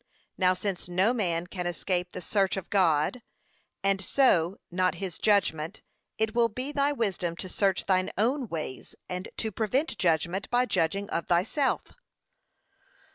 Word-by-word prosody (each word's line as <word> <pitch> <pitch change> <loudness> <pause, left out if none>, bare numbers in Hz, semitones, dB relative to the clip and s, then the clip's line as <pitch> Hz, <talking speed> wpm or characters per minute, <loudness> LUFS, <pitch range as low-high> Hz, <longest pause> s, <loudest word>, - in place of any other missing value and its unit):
Now 185 -1 +3
since 185 -1 -3
no 190 +7 +3
man 175 -7 0
can 180 0 -4
escape 180 +1 -1
the - - -6
search 195 0 +1
of 190 - -6
God, 180 - +2 0.6
and 195 -1 +2
so, 190 -6 +3
not 185 +1 +1
his 190 -4 -5
judgment; 180 -7 +1 0.3
it 220 0 0
will 235 -1 +3
be 255 +6 -4
thy 285 0 +2
wisdom 195 -10 -1
to 185 - -6
search 195 0 +1
thine 185 -1 +2
own 250 +5 +1
ways, 155 -7 -6
and 180 +2 -5
to 220 - -1
prevent 225 - -1
judgment 175 +3 +1
by 245 +1 +3
judging 200 -1 0
of 170 - -2
thyself. 190 - +1
190 Hz, 150 wpm, -28 LUFS, 175-220 Hz, 0.6 s, Now